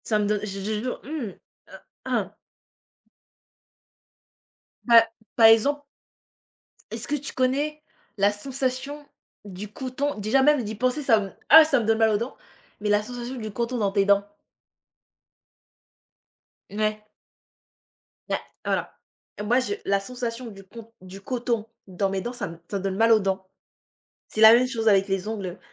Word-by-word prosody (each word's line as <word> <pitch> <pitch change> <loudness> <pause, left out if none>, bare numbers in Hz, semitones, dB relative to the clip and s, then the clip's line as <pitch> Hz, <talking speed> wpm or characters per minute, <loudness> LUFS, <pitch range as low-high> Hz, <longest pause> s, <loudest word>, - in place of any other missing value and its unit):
Ça 215 -2 +1
me 210 - +1
donne 210 0 0
je 195 -1 -6
je 195 - -6
je 215 0 -1
jure, 250 +1 -4
mmh. 285 -3 -4 0.4
Heu, - - -11 0.3
ah - - -2 2.5
Bah, 230 -2 +7 0.3
par 225 -2 +7
exemple. 255 +6 +4 1.1
Est-ce - - -5
que 295 - 0
tu 285 -1 -6
connais, 285 +4 0 0.4
la 200 +1 +3
sensation, 270 +5 -4 0.4
du 200 +1 -8
coton? 265 +5 -3
Déjà 220 +6 +2
même 295 -2 +4
d'y 215 +1 -5
penser 255 +6 0
ça 235 -6 +4
me, 195 -1 -6 0.2
ah! 320 +2 +10
Ça 285 -4 +2
me 225 - -2
donne 225 0 +2
mal 225 0 +4
aux 210 - +2
dents, 235 +5 -5 0.5
mais 210 - -1
la 205 0 +3
sensation 245 +3 -7
du 220 -4 -5
coton 235 +3 -2
dans 205 -4 0
tes 200 -1 +2
dents? 200 0 +3 2.4
Mouais. 215 +1 -1 1.3
Ouais, - - +1 0.3
voilà. - - -2 0.4
Moi 235 +5 +2
je 240 -6 -2
la 200 0 +2
sensation 240 +2 -5
du 195 -1 -13
q 235 - -16
on 225 0 -13
du 185 +1 -11
coton 235 -1 -2 0.2
dans 190 +1 -1
mes 190 0 -2
dents, 240 +5 -5
ça 245 - -4
me, 165 - -10
ça 200 - -2
me 195 - -6
donne 195 -1 -2
mal 225 +1 +4
aux 220 - +6
dents. 190 -1 -2 0.8
C'est 215 - -4
la 220 0 +10
même 250 +2 +4
chose 230 -3 -3
avec 195 -2 +4
les 195 0 -2
ongles, 195 -5 -5
225 Hz, 170 wpm, -25 LUFS, 200-255 Hz, 2.5 s, ah